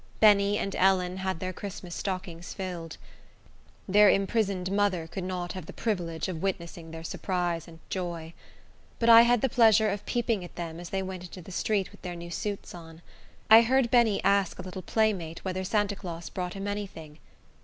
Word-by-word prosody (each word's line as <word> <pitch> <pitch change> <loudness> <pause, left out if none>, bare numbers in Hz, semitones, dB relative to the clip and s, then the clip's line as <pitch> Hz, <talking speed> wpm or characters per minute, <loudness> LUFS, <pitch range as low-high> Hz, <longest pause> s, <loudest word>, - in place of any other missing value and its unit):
Benny 205 -1 +5
and 195 - -3
Ellen 185 -1 +2
had 190 -2 -2
their 185 +1 -4
Christmas 185 -2 -7
stockings 185 -3 -5
filled. 175 -4 -5 0.9
Their 205 +1 +6
imprisoned 195 -2 +1
mother 200 -4 +1
could 180 +3 -6
not 180 -2 -3
have 185 -4 -7
the - - -8
privilege 175 -7 -2
of 170 -4 -5
witnessing 170 -3 -4
their 165 0 -8
surprise 175 -1 -2
and 165 -1 -13
joy. 170 -3 -4 0.6
But 235 - +2
I 230 0 +11
had 240 -1 +4
the - - +3
pleasure 220 -3 +5
of 200 0 -4
peeping 230 -5 0
at 175 - -11
them 165 -1 -5
as 175 -1 -8
they 190 0 -2
went 185 -1 -6
into 180 0 -10
the 190 - -11
street 200 +1 0
with - - -17
their 180 -2 -5
new 170 0 -8
suits 205 +3 -4
on. 165 -1 -12 0.4
I 220 +1 +9
heard 245 +1 +2
Benny 235 -4 +4
ask 195 -1 +2
a - - -6
little 185 0 -7
playmate 190 -6 -1
whether 185 0 -2
Santa 205 +1 0
Claus 170 -4 -7
brought 180 0 -4
him 195 +1 -4
any 205 0 -2
thing. 155 -4 -12
185 Hz, 190 wpm, -28 LUFS, 175-205 Hz, 0.9 s, I